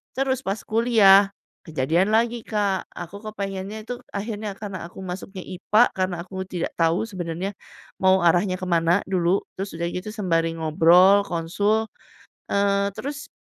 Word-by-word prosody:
terus 265 -1 0
pas 195 +3 -1
kuliah, 210 -4 +5 0.3
kejadian 160 +6 +1
lagi 235 +1 +2
Kak, 205 -3 -1
aku 175 +4 -8
kepengennya 200 0 -5
tuh 245 - -3 0.2
akhirnya 210 0 -4
karena 200 -5 -6
aku 180 - -13
masuknya 185 +1 -7
IPA, 210 +5 +2
karena 185 -1 0
aku 190 +1 -12
tidak 175 -2 -3
tahu 165 +4 +2
sebenernya, 180 0 -4 0.5
mau 190 0 +4
arahnya 175 +3 +3
kemana 175 0 +2
dulu, 180 0 +2 0.2
terus 195 -1 -5
udah 170 0 -1
gitu 180 +4 -5
sembari 165 -6 0
ngobrol, 175 +5 +5
konsul, 205 +7 0 0.7
eee, 200 0 +2
terus, 285 +1 -6
195 Hz, 140 wpm, -23 LUFS, 175-210 Hz, 0.7 s, kuliah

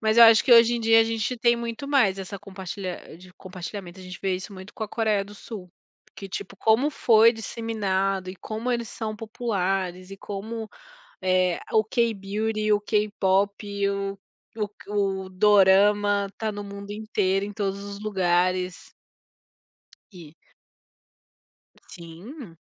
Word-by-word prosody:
Mas 220 0 +1
eu 235 - +11
acho 225 -3 +7
que, 250 - +5
hoje 235 0 +7
em 235 - -2
dia, 225 0 +5
a - - +4
gente 225 +2 -2
tem 235 0 +3
muito 235 +4 -5
mais 215 -10 +3
essa 195 +1 -6
compartilha 190 -3 -7
de 180 0 -15
compartilhamento, 185 0 -8
a - - -10
gente 185 0 -9
vê 190 -1 +1
isso 185 +3 -9
muito 190 +1 -11
com 220 - -3
a - - -9
Coreia 215 -3 0
do 205 +1 -13
Sul. 200 -3 -9 0.4
Porque, 195 - -10
tipo, 195 +1 -6
como 225 +9 +3
foi 230 -4 +5
disseminado 195 -4 -2
e 190 - -10
como 220 +6 -4
eles 235 -2 -2
são 215 0 -5
populares 195 -5 -2
e 195 - -8
como, 215 +3 -6 0.5
eh, 185 -1 +2
o 220 - +5
K-beauty, 215 -1 -1
o 205 - +1
K-pop 200 -1 0
o 200 0 -3 0.4
o 210 -1 -1
k 205 0 -14
o 195 -2 -1
dorama 205 +1 +4
tá 220 -1 -2
no 205 0 -6
mundo 200 0 -8
inteiro 200 -2 0
em 205 - -7
todos 200 -1 -3
os 200 0 -7
lugares. 185 -2 0 1.2
E 165 -5 -12 1.6
Sim. 175 - -11
200 Hz, 155 wpm, -25 LUFS, 190-220 Hz, 1.6 s, eu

